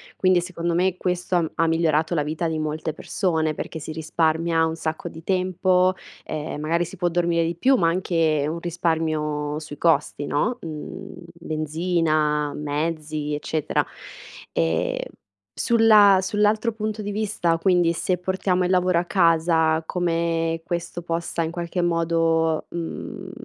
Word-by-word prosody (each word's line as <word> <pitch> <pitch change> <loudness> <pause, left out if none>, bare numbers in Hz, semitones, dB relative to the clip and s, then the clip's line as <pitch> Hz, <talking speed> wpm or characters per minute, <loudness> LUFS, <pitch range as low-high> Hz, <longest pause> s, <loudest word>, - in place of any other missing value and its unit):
quindi 185 -1 +3
secondo 170 -1 -3
me 185 +1 +2
questo 180 0 -1
ha 175 - +4
m 160 - -2
ha 165 - +2
migliorato 160 0 +1
la 150 - +1
vita 155 +3 -2
di 160 -1 -2
molte 155 +1 -3
persone, 160 -4 -1
perché 160 - -5
si 155 +1 -7
risparmia 160 +1 +1
un 160 0 -2
sacco 160 -1 -4
di 160 0 -11
tempo, 185 0 +2 0.3
ehm, 150 -1 -4
magari 170 +3 +1
si 185 - -9
può 175 0 +1
dormire 170 -1 +1
di 170 0 -2
più, 265 +10 +4
ma 170 -9 +3
anche 165 -4 +1
un 165 +2 -3
risparmio 155 -3 -1
sui 150 -2 -9
costi, 145 -3 +1
no, 220 +12 0
mhmm 165 +5 -7 0.2
benzina, 155 -2 0
mezzi, 150 0 -3
eccetera. 150 0 -1 0.7
Ehm 80 0 0 0.6
sulla 215 -4 +6
sull'altro 210 +4 +1
punto 215 0 -3
di 205 0 -4
vista, 200 -5 0
quindi, 175 -1 +3
se 180 +2 -1
portiamo 185 0 0
il - - -1
lavoro 180 -1 +3
a 175 - -2
casa, 165 -3 +3
come 165 -1 0
questo 175 0 -4
possa 170 0 -2
in 160 - -3
qualche 175 +1 -3
modo, 165 -1 +1
mhmm 185 +3 -6
165 Hz, 150 wpm, -23 LUFS, 160-180 Hz, 0.7 s, sulla